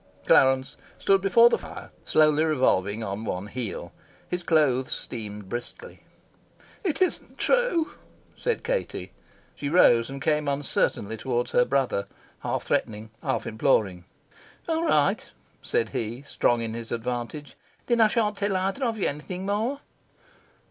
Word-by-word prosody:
Clarence 130 0 +4 0.2
stood 195 -1 +3
before 200 +5 +6
the - - +2
fire, - - -10
slowly 155 0 +4
revolving 115 -9 +1
on 100 +1 -4
one 95 -3 -3
heel. 115 0 -5 0.4
His 180 0 -2
clothes 145 -7 +2
steamed 105 -4 -5
briskly. 120 - -7 0.8
"It 370 -1 +2
isn't 365 - -2
true," - - +2 0.4
said 475 -2 -2
Katie. - - -3 0.4
She 140 - -4
rose 120 -8 +5
and 135 0 -6
came 150 0 +1
uncertainly 140 -6 0
towards 120 +1 -2
her 125 - +4
brother, 130 -7 0 0.3
half - - -2
threatening, 110 0 -2
half - - -1
imploring. 105 -6 +1 0.6
"All 325 0 0
right," - - +3 0.4
said 465 - 0
he, 115 +4 -4
strong 120 -4 +1
in 110 -1 -4
his 115 0 -7
advantage. 120 +4 -4 0.3
"Then 235 -1 +2
I 220 - +7
shan't 210 -2 0
tell 200 -1 0
either 195 +8 -1
of 230 -3 0
you 205 - +1
anything 180 +6 -5
more." 225 +8 -1
140 Hz, 140 wpm, -26 LUFS, -, 0.8 s, I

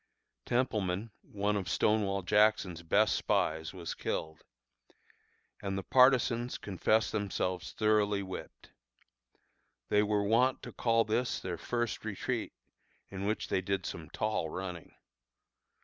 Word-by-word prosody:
Templeman, 110 -4 0
one 105 +1 -1
of 100 -3 -2
Stonewall 100 -3 +1
Jackson's 105 -3 +3
best 85 - +3
spies, 80 0 0
was 90 -3 -5
killed; 80 0 -4 1.2
and 95 -1 -2
the 95 - -3
partisans 125 -1 +4
confessed 110 +3 +1
themselves 95 -3 -2
thoroughly 105 -2 +2
whipped. 95 -1 -9 1.2
They 105 - +4
were 105 -1 +1
wont 120 +5 +2
to - - -7
call 115 -1 +2
this 120 +3 0
their 90 -3 -5
first 120 +1 -2
retreat, - - -3 0.6
in 100 +1 -4
which 110 - -2
they 95 - +1
did 95 0 -2
some 80 -2 -6
tall 105 -5 -1
running. 90 -2 -6
100 Hz, 120 wpm, -32 LUFS, 95-110 Hz, 1.2 s, partisans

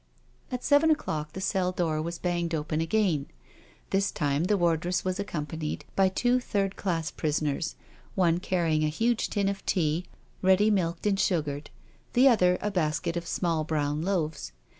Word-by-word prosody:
At 250 -1 -3
seven 290 +2 +4
o'clock 155 - -1
the - - -5
cell 185 -1 0
door 165 -4 -1
was 170 +2 -4
banged 175 -2 -1
open 155 +1 -1
again. 165 -4 +1 0.6
This 195 +1 +2
time 145 +2 0
the 205 +2 +2
wardress 175 +1 +1
was 185 +1 -1
accompanied 155 -5 -4
by, 190 -1 +4
two 245 +6 +2
third 200 -5 -1
class 165 -5 -2
prisoners, 150 0 -1 0.4
one 175 -3 +3
carrying 165 -4 +1
a - - +3
huge 230 +8 0
tin 200 -2 0
of 195 0 -2
tea, 165 -1 +1 0.4
ready 190 +3 +4
milked 170 -3 0
and 200 -2 +2
sugared, 150 -6 0 0.4
the 255 +3 +6
other 180 -8 +4
a 210 - -1
basket 160 -3 -1
of 170 0 -4
small 165 -3 0
brown 150 -1 -1
loaves. 160 - -2
175 Hz, 160 wpm, -28 LUFS, 155-195 Hz, 0.6 s, the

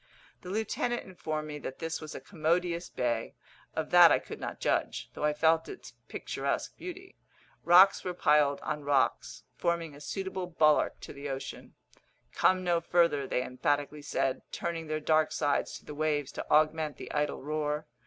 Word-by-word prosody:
The 180 - -9
lieutenant 220 +4 -1
informed 155 -5 -4
me 150 -1 -6
that 135 - -6
this 165 -1 -4
was 155 -1 -8
a - - -5
commodious 170 0 -1
bay. 120 -2 -2 0.4
Of - - -3
that - - +9
I - - +5
could - - -8
not - - -5
judge, - - -1
though - - -6
I 150 - +3
felt 160 +2 +2
its 370 - -10
picturesque - - -3
beauty. 375 +2 -9 0.4
Rocks 185 +3 +7
were 180 -1 -3
piled 150 -4 +3
on 150 0 -3
rocks, 140 -4 0
forming 170 -3 -1
a 145 - -13
suitable 190 +2 -4
bulwark 155 -3 +3
to - - -8
the 140 0 -6
ocean. 135 0 -6 0.6
"Come 185 0 +3
no 175 -2 +2
further," 170 -5 +2
they 125 - 0
emphatically 145 +4 -1
said, 135 -2 -1
turning 165 -2 -4
their 155 0 -1
dark 155 0 +2
sides 145 -1 0
to - - -19
the 150 - -7
waves 150 -2 -1
to - - -7
augment 155 0 +2
the - - -8
idle 150 -2 -1
roar. 150 0 -2
155 Hz, 175 wpm, -30 LUFS, 145-170 Hz, 0.6 s, that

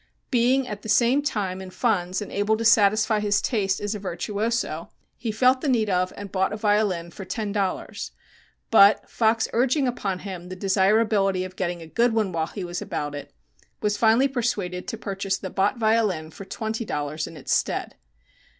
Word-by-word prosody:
Being, 255 +1 +3
at 210 -3 -6
the 220 - -8
same 240 +6 +4
time, 200 -10 -2
in 190 - -8
funds, 185 -2 0
and - - -10
able 205 +2 +1
to 230 - -3
satisfy 215 0 +4
his 205 -1 +2
taste 195 -5 0
as 205 +1 -2
a 210 - -5
virtuoso, 200 -1 -2 0.3
he 230 -1 -3
felt 255 +4 +3
the 295 - 0
need 220 -5 +2
of 185 0 +1
and 200 -2 -7
bought 190 -1 +1
a 210 - -3
violin 205 -5 +1
for 195 - -8
ten 210 +2 -3
dollars, 200 -2 -3 0.6
but, 205 -2 +6
Fox 225 0 +1
urging 260 +3 +2
upon 200 -6 -2
him 180 -2 -8
the 185 - -6
desirability 195 0 +2
of 185 0 -8
getting 175 -2 -3
a - - -9
good 230 +8 +1
one 215 -4 +1
while 160 -2 -1
he 195 - -6
was 175 0 -4
about 145 -1 -4
it, 145 -1 -7 0.5
was 210 -1 0
finally 225 +5 +4
persuaded 210 -9 -2
to 225 - -4
purchase 195 -2 -2
the 190 - -7
Bott 200 +4 +1
violin 215 -8 +1
for 195 - -10
twenty 220 +3 -4
dollars 150 -4 -3
in 165 - -10
its 130 -2 -2
stead. - - -1
205 Hz, 190 wpm, -24 LUFS, 185-225 Hz, 0.6 s, but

